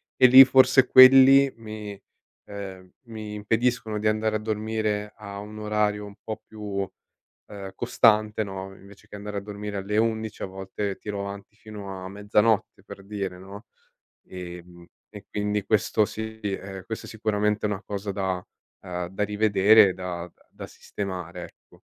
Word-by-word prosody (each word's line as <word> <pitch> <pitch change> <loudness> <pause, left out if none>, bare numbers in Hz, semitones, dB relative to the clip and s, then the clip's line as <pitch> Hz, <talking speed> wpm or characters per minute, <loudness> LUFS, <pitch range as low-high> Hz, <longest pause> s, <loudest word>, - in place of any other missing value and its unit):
e 130 - +7
lì 130 +2 +10
forse 130 0 +5
quelli 135 +1 +8
mi 105 -3 -8 0.4
ehm, 95 -2 -9 0.2
mi 110 -2 -7
impediscono 110 +1 -1
di 110 - 0
andare 110 0 +1
a - - -8
dormire 110 -1 -2
a 100 -2 -8
un 105 +1 -9
orario 105 -1 -1
un 100 - -12
po' 110 -1 -6
più, 100 -3 -5 0.6
ehm, 100 -2 -8
costante, 110 -3 +2
no, 95 -1 -7
invece 100 +1 -17
che - - -11
andare 105 0 -6
a - - 0
dormire 105 0 -6
alle 100 +2 -3
11 110 -1 -1
a - - -3
volte 95 +1 -5
tiro 100 -1 -5
avanti 100 +2 -8
fino 100 -3 -9
a 95 - -7
mezzanotte, 105 +2 0
per 95 - -12
dire, 100 -3 -5
no, 100 +4 -12 0.6
ehm, 90 -1 -10 0.3
e 105 -1 -11
quindi 105 0 -2
questo 110 0 +2
sì, 110 +1 -7
ehm, 95 -1 -5
questa 110 -1 -6
sicuramente 105 -1 -1
è - - +1
una 105 0 -4
cosa 100 0 -4
da 95 -2 -2 0.4
uhm, 90 -2 -4
da 95 +3 -2
rivedere, 105 -1 +5
da 90 -2 -6 0.2
da - - -9
sistemare, 90 -3 -7
ecco. - - -17
105 Hz, 155 wpm, -25 LUFS, 95-110 Hz, 0.6 s, lì